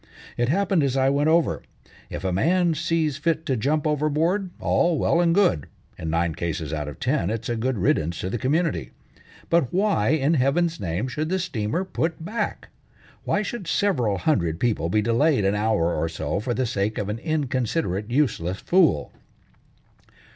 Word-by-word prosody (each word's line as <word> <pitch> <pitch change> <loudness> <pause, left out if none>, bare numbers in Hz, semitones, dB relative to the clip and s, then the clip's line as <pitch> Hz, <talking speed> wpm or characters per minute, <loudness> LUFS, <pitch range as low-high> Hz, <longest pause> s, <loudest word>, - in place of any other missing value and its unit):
It 120 +1 0
happened 190 +1 +2
as 135 -2 0
I 135 0 +3
went 145 +2 +2
over. 165 0 +2 0.5
If - - -6
a 95 -1 0
man 170 - +2
sees 160 -2 0
fit 160 +1 -1
to 135 -5 0
jump 145 +7 0
overboard, 155 +6 +1
all 170 -2 +2
well 170 +4 +2
and 170 -1 +3
good; 185 - +2 0.3
in 80 - -5
nine 85 0 0
cases 80 -2 -3
out 75 -2 -3
of 75 - -8
ten 85 - 0
it's 115 +1 -3
a 120 - 0
good 125 +2 -1
riddance 85 -3 0
to 95 - -3
the 120 - -2
community. 140 - 0 0.6
But 165 -7 +3
why 195 - +1
in 155 +1 +2
Heaven's 160 +4 +1
name 90 +6 -2
should 150 +5 -3
the 190 - +1
steamer 165 - -2
put 165 -3 -3
back? 225 +5 -3 0.6
Why 205 - +1
should 210 -4 -5
several 125 - +1
hundred 85 - 0
people 105 -9 0
be 105 +3 +2
delayed 120 +1 +2
an 100 - +2
hour 105 -5 +1
or 80 +2 -1
so 80 +1 -3
for 120 +3 -2
the 130 - 0
sake 110 -2 -1
of 105 - -2
an 105 +2 -3
inconsiderate, 130 - -1
useless 110 - 0
fool?" 170 - +2
130 Hz, 175 wpm, -24 LUFS, 100-165 Hz, 0.6 s, I